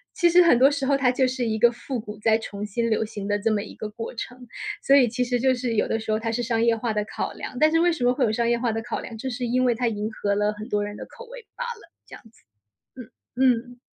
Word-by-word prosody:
其 345 -2 +4
实 355 +1 +6
很 335 -8 +5
多 265 +2 +7
时 285 -2 -2
候 280 +1 +3
它 265 -2 +3
就 260 0 +2
是 255 0 -2
一 220 -1 -1
个 235 +2 +5
复 245 +1 -5
古 210 -1 -9
在 220 +1 +3
重 205 -2 -7
新 230 +3 -1
流 220 - +2
行 205 -2 -6
的 205 0 0
这 220 +2 +1
么 205 -1 0
一 - - -10
个 215 - -6
过 225 +2 -7
程， 250 +1 -8 0.4
所 275 - +5
以 265 -3 +6
其 245 +2 -1
实 245 0 0
就 260 +1 +3
是 245 -1 -2
有 215 - +1
的 225 - -1
时 220 0 -4
候 215 - +1
它 225 0 -2
是 240 +2 -2
商 230 0 0
业 230 -1 +3
化 225 0 -2
的 210 0 0
考 - - -4
量， 250 - -7
但 310 0 +5
是 330 - +3
为 345 +1 +4
什 320 -7 -3
么 245 0 +4
会 265 +1 0
有 225 - +2
商 235 +2 0
业 235 0 +2
化 235 -1 0
的 225 - -2
考 - - -3
量？ 230 - -8
就 240 - -5
是 245 +1 -5
因 250 +2 +1
为 250 -1 +3
它 240 +1 -1
迎 215 0 -2
合 200 -2 -1
了 210 +1 +1
很 210 +1 -9
多 205 0 0
人 205 0 -6
的 - - -7
口 475 - -12
味 - - -10
罢 - - -4
了， 470 -1 -8
这 - - -16
样 - - -14
子， 220 - -27 0.5
嗯 250 -4 -10 0.7
嗯。 - - -31
235 Hz, 330 characters per minute, -24 LUFS, 215-255 Hz, 0.7 s, 多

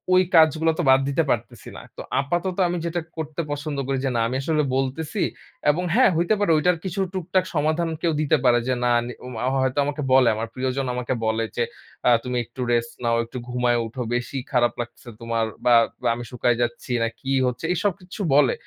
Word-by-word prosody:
ওই 185 - +6
কাজগুলো 160 0 +5
তো - - +2
বাদ 130 0 +7
দিতে 150 +4 +2
পারতেছি 120 -1 -2
না। - - -8 0.2
তো - - -5 0.2
আপাতত 175 +6 -2
আমি 175 +1 -2
যেটা 170 +1 -1 0.2
করতে 160 +1 -3
পছন্দ 145 0 -3
করি 135 0 0
যে, - - +1
না - - +2
আমি 125 - -3
আসলে 155 +1 +1
বলতেছি 145 +8 -2 0.5
এবং 165 +5 +2
হ্যাঁ, 255 -1 +6
হইতে 170 +5 +2
পারে। 205 -5 +2
ঐটার 180 +3 +2
কিছু 190 +1 -3
টুকটাক 185 0 0
সমাধান 155 +3 +1
কেউ 170 - +2
দিতে 155 +1 +3
পারে। 120 -2 +5
যে 130 - +2
না 120 - +3
নি 120 - -6
ওমা 125 -3 -6 0.2
হয়তো 130 +1 -1
আমাকে 145 +1 -3
বলে, 130 -2 +6
আমার 110 +1 -3
প্রিয়জন 130 +1 -2
আমাকে 125 +1 -2
বলে, 110 +1 +1
যে 120 - +1 0.4
আ - - +7
তুমি 125 -1 -2
একটু 120 +3 -9
রেস্ট 120 0 0
নাও, 115 0 +2
একটু 125 +3 -9
ঘুমায়ে 125 -1 +1
উঠো। 120 +3 -6
বেশি 120 +3 -3
খারাপ 120 -3 +3
লাগছে 120 +1 -10
তোমার 115 -1 0 0.2
বা 120 - +6 0.4
আমি 120 - -6
শুকায় 120 -1 +1
যাচ্ছি, 120 +1 -3
না - - +2
কি 135 - -4 0.2
হচ্ছে, 125 +6 -3
এসব 190 +4 +1
কিছু 180 +3 -8
বলে। 140 -4 +5
135 Hz, 205 wpm, -23 LUFS, 120-165 Hz, 0.5 s, বাদ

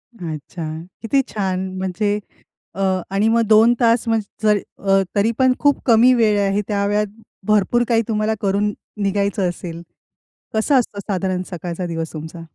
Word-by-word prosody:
अच्छा. 165 -2 -6 0.4
किती 270 +4 +2
छान 190 -2 -2
म्हणजे. 205 +3 -1 0.6
अ, 195 - -4 0.3
आणि 200 +3 +2
मग 230 0 +3
2 220 +2 +6
तास 230 0 +3
म्हणजे 220 -1 -1
जर 210 -1 +5 0.3
अ, 195 0 +5
तरी 210 +3 +3
पण 260 -1 +5
खूप 285 -1 +2
कमी 240 +1 +6
वेळ 215 -4 +3
आहे 200 +1 +1
त्या 200 -1 0
वेळात 210 0 +1 0.4
भरपूर 215 +3 +3
काही 230 -1 +3
तुम्हाला 215 0 0
करून 200 +1 +1 0.3
निघायचं 200 -1 0
असेल. 170 -1 -7 0.7
कसं 220 +6 +2
असतं 210 -4 -2
साधारण 185 -1 -1
सकाळचा 175 0 -4
दिवस 165 -1 -4
तुमचा? 160 +2 -8
205 Hz, 155 wpm, -20 LUFS, 185-225 Hz, 0.7 s, 2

